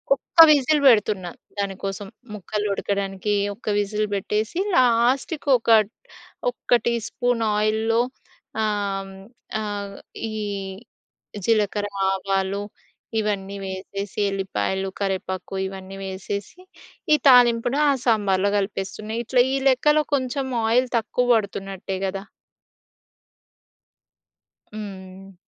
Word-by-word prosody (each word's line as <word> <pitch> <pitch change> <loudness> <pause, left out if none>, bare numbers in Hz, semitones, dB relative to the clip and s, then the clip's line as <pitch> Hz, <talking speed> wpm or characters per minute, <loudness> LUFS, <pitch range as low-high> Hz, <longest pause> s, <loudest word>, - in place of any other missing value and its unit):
ఒక్క 275 - -6
విజిల్ 295 +1 +3
పెడుతున్న 210 -5 +4 0.3
దానికోసం. 195 0 -3 0.3
ముక్కలు 210 +1 -3
ఉడకడానికి 195 0 -2 0.2
ఒక్క 220 - -20
విజిల్ 210 +1 0
పెట్టేసి 215 - -2 0.2
లాస్ట్‌కి 255 +5 +2
ఒక 230 - -5 0.8
ఒక్క - - -15
టీ-స్పూన్ 235 +1 0 0.2
ఆయిల్‌లో 220 +2 +2 0.6
ఆహ్, 200 -2 -1 0.5
ఆహ్, 205 -1 -4 0.4
ఈ - - -6 1.1
జీలకర్ర, 210 -2 +1 0.2
ఆవాలు 195 +1 -1 0.6
ఇవన్నీ 200 -2 -2
వేసేసి 195 +2 -6
ఎల్లిపాయలు, 190 - -2
కరివేపాకు 190 -1 -3
ఇవన్నీ 190 0 -9
వేసేసి, 195 - -5 0.5
ఈ - - +8
తాలింపును 245 +2 +5
ఆ - - +5
సాంబార్‌లో 200 -4 +2
కలిపేస్తున్న. 205 +3 -3
ఇట్లా 245 +1 +3
ఈ - - +2
లెక్కలో 300 +4 +3
కొంచెం 265 0 -2 0.2
ఆయిల్ 250 +2 +3
తక్కువ 245 +2 0
పడుతున్నట్టే 195 -2 -3
గదా! 195 +1 -4 2.5
హ్మ్. 195 -2 -9
205 Hz, 90 wpm, -23 LUFS, 195-230 Hz, 2.5 s, ఈ